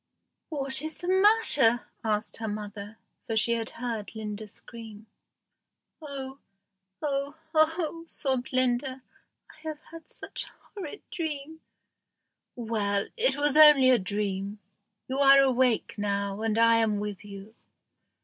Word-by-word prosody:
"What 275 Hz, -3 st, +1 dB
is 315 Hz, 0 st, -5 dB
the 350 Hz, -, -7 dB
matter?" 375 Hz, -, +4 dB, 0.2 s
asked 215 Hz, -1 st, -2 dB
her 225 Hz, -, -4 dB
mother, 210 Hz, 0 st, -7 dB, 0.3 s
for 225 Hz, -, -1 dB
she 225 Hz, +2 st, +3 dB
had 230 Hz, -1 st, -2 dB
heard 230 Hz, -3 st, -5 dB
Linda 215 Hz, 0 st, -6 dB
scream. 220 Hz, 0 st, -12 dB, 1.0 s
"Oh! 275 Hz, -2 st, -7 dB, 0.6 s
oh! 280 Hz, 0 st, -2 dB, 0.2 s
oh!" 320 Hz, +1 st, +1 dB
sobbed 265 Hz, -5 st, -3 dB
Linda, 255 Hz, +1 st, 0 dB, 0.5 s
"I -, -, -20 dB
have 310 Hz, -1 st, -5 dB
had 330 Hz, -1 st, -12 dB
such -, -, -5 dB
a -, -, -15 dB, 0.2 s
horrid 385 Hz, -1 st, -8 dB
dream." 315 Hz, -1 st, -5 dB, 0.9 s
"Well, 210 Hz, -4 st, -1 dB
it -, -, +1 dB
was 290 Hz, 0 st, +2 dB
only 300 Hz, -4 st, +8 dB
a 250 Hz, -, +4 dB
dream. 200 Hz, +1 st, -3 dB, 0.5 s
You 265 Hz, +1 st, -3 dB
are 275 Hz, 0 st, +7 dB
awake 255 Hz, -3 st, +2 dB
now, 200 Hz, 0 st, -2 dB
and 220 Hz, -1 st, 0 dB
I 230 Hz, 0 st, +5 dB
am 215 Hz, -2 st, +1 dB
with 205 Hz, -1 st, -5 dB
you." 200 Hz, +1 st, -11 dB
245 Hz, 130 wpm, -27 LUFS, 215-290 Hz, 1.0 s, only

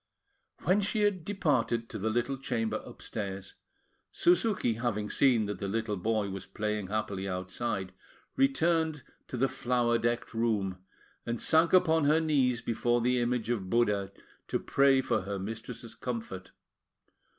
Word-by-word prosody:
When 190 Hz, +4 st, +3 dB
she 210 Hz, +2 st, 0 dB
had 205 Hz, -5 st, +1 dB
departed 130 Hz, -, 0 dB
to 110 Hz, -, -6 dB
the 110 Hz, +3 st, 0 dB
little 120 Hz, +4 st, 0 dB
chamber 115 Hz, -5 st, -2 dB
upstairs, 100 Hz, -5 st, -6 dB, 0.6 s
Suzuki, 180 Hz, -, +2 dB
having 110 Hz, -2 st, -2 dB
seen 125 Hz, -6 st, +4 dB
that 100 Hz, -2 st, -4 dB
the 100 Hz, -, -3 dB
little 110 Hz, +1 st, -1 dB
boy 105 Hz, +1 st, -1 dB
was 95 Hz, -1 st, -7 dB
playing 105 Hz, -2 st, -2 dB
happily 100 Hz, -2 st, -2 dB
outside, 95 Hz, +2 st, -3 dB, 0.4 s
returned 165 Hz, -, +2 dB, 0.2 s
to 125 Hz, -, -5 dB
the 135 Hz, +3 st, +3 dB
flower 120 Hz, -2 st, +1 dB
decked 120 Hz, +1 st, -1 dB
room, 105 Hz, -5 st, 0 dB, 0.4 s
and 120 Hz, -1 st, -3 dB
sank 160 Hz, +1 st, +4 dB
upon 160 Hz, -4 st, +4 dB
her 155 Hz, +2 st, +4 dB
knees 135 Hz, -7 st, +1 dB
before 120 Hz, +1 st, +1 dB
the 125 Hz, +1 st, +2 dB
image 120 Hz, -1 st, 0 dB
of 100 Hz, -6 st, -2 dB
Buddha 105 Hz, -4 st, +1 dB, 0.4 s
to -, -, 0 dB
pray 135 Hz, -1 st, +3 dB
for 130 Hz, -, 0 dB
her 100 Hz, +1 st, -4 dB
mistress's 115 Hz, +4 st, -6 dB
comfort. 110 Hz, -7 st, -5 dB
120 Hz, 145 wpm, -30 LUFS, 105-135 Hz, 0.6 s, seen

